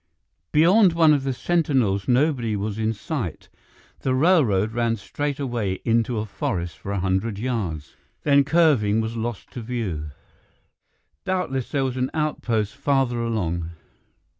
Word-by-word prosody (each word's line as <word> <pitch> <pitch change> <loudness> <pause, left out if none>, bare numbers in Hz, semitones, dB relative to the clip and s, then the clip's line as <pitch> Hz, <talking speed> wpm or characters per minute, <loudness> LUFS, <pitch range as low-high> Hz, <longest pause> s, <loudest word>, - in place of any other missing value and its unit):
Beyond 180 +5 +5
one 160 -2 +5
of 140 -2 +1
the 135 - 0
sentinels 130 - +1
nobody 125 -4 +2
was 105 +1 -3
in 110 0 +1
sight; 115 - -5 0.5
the 130 -1 0
railroad 130 - +3
ran 120 -1 +1
straight 145 +7 -4
away 120 -8 -1
into 115 0 +1
a 105 - -1
forest 95 - -3
for 100 - -6
a 100 - -1
hundred 95 +3 -1
yards, 100 - -3 0.3
then, 140 -1 +5
curving, 140 -9 +3
was 110 +1 -2
lost 115 -2 -5
to 125 - -6
view. 105 -11 -3 1.1
Doubtless 135 -9 -2
there 140 -3 0
was 130 -1 -3
an 130 +1 0
outpost 115 -9 -1
farther 135 -4 +1
along. 85 -8 -2
120 Hz, 140 wpm, -23 LUFS, 105-140 Hz, 1.1 s, Beyond